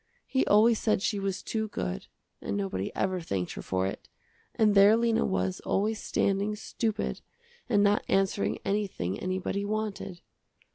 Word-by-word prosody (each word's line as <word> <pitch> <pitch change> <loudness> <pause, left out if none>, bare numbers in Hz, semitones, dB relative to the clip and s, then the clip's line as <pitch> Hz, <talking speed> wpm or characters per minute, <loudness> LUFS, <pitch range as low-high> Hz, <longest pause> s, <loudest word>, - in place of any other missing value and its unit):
He 265 - +1
always 220 +2 +5
said 215 -3 +1
she 205 - 0
was 195 -1 -3
too 220 -1 -2
good, 90 - -4 0.3
and 100 - -2
nobody 95 -1 -2
ever 185 -1 0
thanked 95 - -3
her - - -6
for 95 0 -1
it, 95 - -5 0.5
and 215 -2 +4
there 200 +2 +7
Lena 230 -1 +2
was 95 0 -1
always 215 +2 -1
standing 200 +2 0
stupid 220 0 -3 0.5
and 205 -4 +4
not 205 0 +3
answering 195 +1 +1
anything 195 - -1
anybody 185 +2 -2
wanted. 205 -4 -3
200 Hz, 150 wpm, -28 LUFS, 175-215 Hz, 0.5 s, there